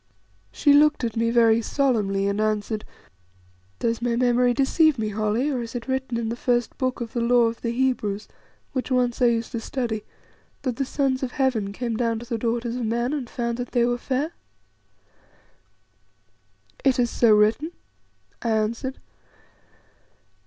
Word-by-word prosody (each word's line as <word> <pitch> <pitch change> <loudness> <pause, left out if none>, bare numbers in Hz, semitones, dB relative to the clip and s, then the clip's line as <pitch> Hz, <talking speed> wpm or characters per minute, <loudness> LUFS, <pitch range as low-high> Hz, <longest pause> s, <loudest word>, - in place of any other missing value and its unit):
She 290 - +3
looked 300 -1 +4
at 230 -2 -2
me 230 0 +1
very 230 -1 +4
solemnly 210 -7 +1
and 200 +1 0
answered 215 0 -1 0.9
"Does 230 - -1
my 240 -1 0
memory 245 0 +3
deceive 280 +4 +3
me, 215 -1 -1
Holly, 215 +7 0
or 255 -3 -1
is 230 +1 -7
it 240 0 -5
written 260 -2 -1
in 230 -1 -2
the 230 - -2
first 240 -1 0
book 255 -2 -1
of 230 -1 -5
the 235 - -1
Law 240 +1 +4
of 230 0 -1
the 235 - -2
Hebrews, 235 -5 -1 0.5
which 260 -2 -2
once 250 -2 +1
I - - +6
used 230 -1 0
to 230 - -3
study, 230 -3 -3 0.6
that 255 -4 -2
the 275 - 0
sons 265 -1 0
of 260 -2 -3
Heaven 250 -8 0
came 235 +2 -3
down 230 -1 0
to 235 - -7
the 230 -1 -3
daughters 235 +1 -1
of 245 - -2
men, 235 +4 0
and 265 -5 -3
found 235 0 -3
that 245 - -5
they 240 -2 +3
were 245 0 0
fair?" 275 +6 -1 2.5
"It 270 -2 +3
is 240 -2 +1
so 235 -2 +4
written," 220 +10 +2 0.7
I 235 - -1
answered. 225 +4 -1
240 Hz, 170 wpm, -24 LUFS, 225-255 Hz, 2.5 s, I